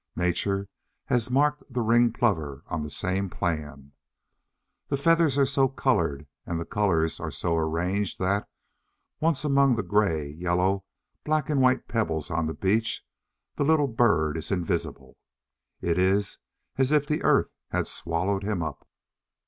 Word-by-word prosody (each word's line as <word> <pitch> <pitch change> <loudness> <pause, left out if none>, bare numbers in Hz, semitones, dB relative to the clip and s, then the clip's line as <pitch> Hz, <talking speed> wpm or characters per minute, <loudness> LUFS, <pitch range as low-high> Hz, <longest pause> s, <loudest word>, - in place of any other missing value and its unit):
Nature 90 +3 0 0.4
has 120 -1 +1
marked 145 +3 +2
the 120 -1 -1
Ringed 115 +1 +3
Plover 80 - 0
on 80 - -3
the 75 - -5
same 95 +6 -1
plan. 75 -6 -4 1.0
The 140 - -1
feathers 165 -1 +3
are 140 - +5
so 135 0 +2
coloured 85 - 0 0.2
and 85 -1 -3
the 85 - -4
colours 90 -7 0
are - - -4
so 85 - -1
arranged 85 +5 -1
that, 100 +2 0 0.7
once 155 -2 +1
among 140 -3 +4
the 115 - -2
grey, 85 -6 +1
yellow, 90 +5 0 0.4
black, 155 -1 0
and 140 -3 +2
white 130 0 +3
pebbles 85 -9 -1
on 80 -1 0
the 80 - -4
beach, 110 +4 0 0.5
the - - +1
little 150 -1 +3
bird 100 - +2
is 80 - -4
invisible. 80 -7 -3 0.6
It 85 +1 0
is 95 +2 +1 0.4
as 135 +1 +2
if 150 -1 +3
the 150 +1 -1
earth - - +3 0.2
had - - -1
swallowed 95 +4 -2
him 100 -4 -2
up. 80 -3 -7
100 Hz, 150 wpm, -26 LUFS, 85-130 Hz, 1.0 s, are